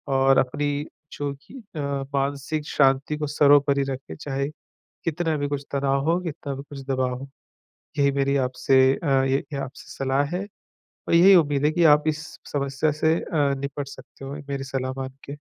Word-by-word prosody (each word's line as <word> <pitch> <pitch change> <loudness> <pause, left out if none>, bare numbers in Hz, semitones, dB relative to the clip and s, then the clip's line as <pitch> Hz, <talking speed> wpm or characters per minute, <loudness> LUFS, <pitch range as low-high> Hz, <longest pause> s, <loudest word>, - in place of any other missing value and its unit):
और 135 0 +4
अपनी 145 +2 -1 0.3
जो 145 -1 -3
कि - - -17 0.2
अ, - - -4 0.4
मानसिक 140 +2 -1
शांति 135 +2 +2
को 150 - -2
सर्वोपरि 140 -1 +4
रखें, 130 -11 -6
चाहे 140 - -3 0.6
कितना 165 -1 0
भी 145 0 -1
कुछ 145 -1 -3
तनाव 140 0 +1
हो, 175 - +3
कितना 155 -5 -5
भी 135 - -7
कुछ 140 -1 -7
दबाव 130 -2 0
हो। 135 - -8 0.7
यही 140 -1 +4
मेरी 140 0 +1
आपसे 130 0 +3
अ, 160 - -4 0.2
ये 135 0 +2 0.2
ही 140 - -3
आपसे 135 0 -7
सलाह 135 +1 +1
हैं 200 +2 -4 0.6
और - - +2
यही 185 +3 +8
उम्मीद 145 -4 +2
हैं 150 - +3
कि 175 -1 +3
आप 150 -1 +6
इस 155 0 -1 0.3
समस्या 140 +1 0
से 160 +2 +2
अ, - - -7 0.4
निपट 140 0 -4
सकते 140 - -12
हो 140 - -5
मेरी 140 -1 -3
सलाह 130 -1 -3
मान 130 0 -5
के। 140 +1 -6
140 Hz, 180 wpm, -24 LUFS, 135-150 Hz, 0.7 s, यही